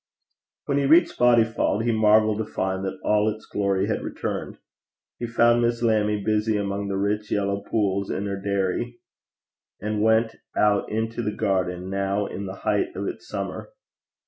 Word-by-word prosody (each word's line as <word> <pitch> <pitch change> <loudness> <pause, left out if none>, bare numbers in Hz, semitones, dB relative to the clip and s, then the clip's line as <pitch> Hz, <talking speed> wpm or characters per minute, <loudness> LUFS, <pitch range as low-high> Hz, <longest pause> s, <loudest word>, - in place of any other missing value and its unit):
When 140 0 +1
he 140 - +1
reached 165 +4 +4
Bodyfauld 115 -3 +3
he 120 - +1
marvelled 110 -1 +4
to 110 - -1
find 95 -2 -2
that 95 - -4
all 105 0 +3
its 110 0 -6
glory 100 -1 0
had 110 - -1
returned. - - -4 0.6
He 120 - -3
found 120 0 +4
Miss 120 0 0
Lammie 105 -2 +2
busy 110 0 +1
among 100 0 -2
the 100 -1 -2
rich 105 +2 -1
yellow 100 -1 0
pools 100 -3 0
in 100 - -2
her 100 -1 -4
dairy, 100 +4 -1 0.8
and 105 +1 -2
went 110 +1 +2 0.2
out 105 -1 +2
into 115 +2 -2
the 105 - -1
garden, 90 -1 -1
now 100 +1 0
in 100 0 -5
the 95 - -6
height 365 -1 0
of - - -3
its - - -6
summer. - - -5
105 Hz, 170 wpm, -24 LUFS, 100-115 Hz, 0.8 s, reached